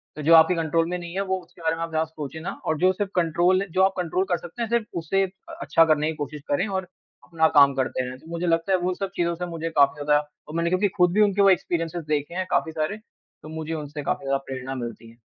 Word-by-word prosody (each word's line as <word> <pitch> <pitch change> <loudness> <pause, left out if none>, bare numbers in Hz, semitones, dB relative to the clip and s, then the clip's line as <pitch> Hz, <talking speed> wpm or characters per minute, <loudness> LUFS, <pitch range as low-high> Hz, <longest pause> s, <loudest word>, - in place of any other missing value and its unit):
तो 155 - -6
जो 165 +2 +5
आपके 160 +2 +6
कंट्रोल 165 0 +1
में 180 - -2
नहीं 170 -1 -8
है, 195 - 0
वो 190 -1 -1
उसके 175 - -19
बारे 160 0 0
में 165 - -7
आप 165 - -4
ज़्यादा 160 0 0
सोचें 160 -1 -7
ना 165 - -4
और 160 - 0
जो 185 +3 +4
सिर्फ़ 200 0 -3
कंट्रोल 175 +2 +2
जो 185 - +1
आप 190 0 +3
कंट्रोल 180 +1 0
कर 175 - +2
सकते 175 +8 -9
हैं, 230 - -1
सिर्फ़ 235 -1 +1
उसे 195 +5 +1
अ 190 +1 -13
अच्छा 150 +4 +4
करने 155 -1 +2
की - - -8
कोशिश 145 0 -5
करें 145 +9 +1
और 190 -2 -3 0.4
अपना 160 -2 +2
काम 140 -1 +7
करते 130 -1 -1
रहें। 125 0 -7
तो 160 - -18
मुझे 170 +1 -2
लगता 165 +3 +1
है - - +5
उन 180 +1 0
सब 195 -1 -4
चीज़ों 170 -1 0
से 180 +1 -4
मुझे 165 -1 -4
काफ़ी 140 +1 +4
ज़्यादा 150 0 +4 0.3
और 155 - -8
मैंने 170 0 +1
क्योंकि 185 +3 +2
खुद 180 -1 +4
भी 215 - +3
उनके 205 -1 +3
वो 195 - +6
एक्सपीरियंसेज़ 170 -3 0
देखे 150 +2 -1
हैं 185 0 -1
काफ़ी 160 - +1
सारे, 155 +7 -2
तो 215 -7 -18
मुझे 160 0 -5
उनसे 150 -1 -5
काफ़ी 140 - -2
ज़्यादा 135 0 +1
प्रेरणा 130 0 -5
मिलती 120 -2 -7
है। 115 - -18
165 Hz, 270 wpm, -24 LUFS, 150-185 Hz, 0.4 s, काम